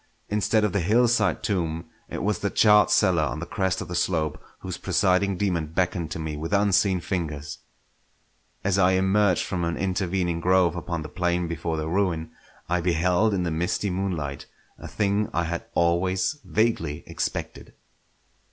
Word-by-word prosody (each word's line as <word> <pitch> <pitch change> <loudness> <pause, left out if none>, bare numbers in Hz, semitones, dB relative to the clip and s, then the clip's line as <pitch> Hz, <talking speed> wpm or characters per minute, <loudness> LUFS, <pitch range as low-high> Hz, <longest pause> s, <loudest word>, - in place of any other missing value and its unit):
Instead 105 +1 +1
of 105 -3 +1
the 100 - +1
hillside 115 +6 +2
tomb, 85 -5 -1 0.2
it - - -4
was 105 +1 0
the 100 - -1
charred 105 -1 +5
cellar 90 -6 +3
on 75 - -1
the 85 - -4
crest 95 0 -1
of - - -6
the 90 - -6
slope 80 -3 -1 0.2
whose - - -5
presiding 95 0 +2
daemon 90 -5 0
beckoned 85 0 -1
to 80 - -5
me 80 -1 -4
with 80 +5 -4
unseen 100 -1 +3
fingers. 80 -5 -4 1.0
As 100 0 +1
I 95 0 +4
emerged 95 0 +3
from 90 -3 -2
an 85 0 -1
intervening 90 -2 -1
grove 90 -1 +3
upon 85 -2 -4
the - - -6
plain 90 +1 -1
before 80 0 -3
the 80 0 -3
ruin, 85 -3 -1 0.4
I 90 +1 0
beheld 90 +5 +2
in 90 - 0
the 85 - -1
misty 90 +5 -1
moonlight 85 -7 -3 0.3
a - - -8
thing 105 0 0
I 85 - +2
had 85 +1 -4
always 90 - +1
vaguely 95 -10 0
expected. - - -5
90 Hz, 165 wpm, -25 LUFS, 85-100 Hz, 1.0 s, charred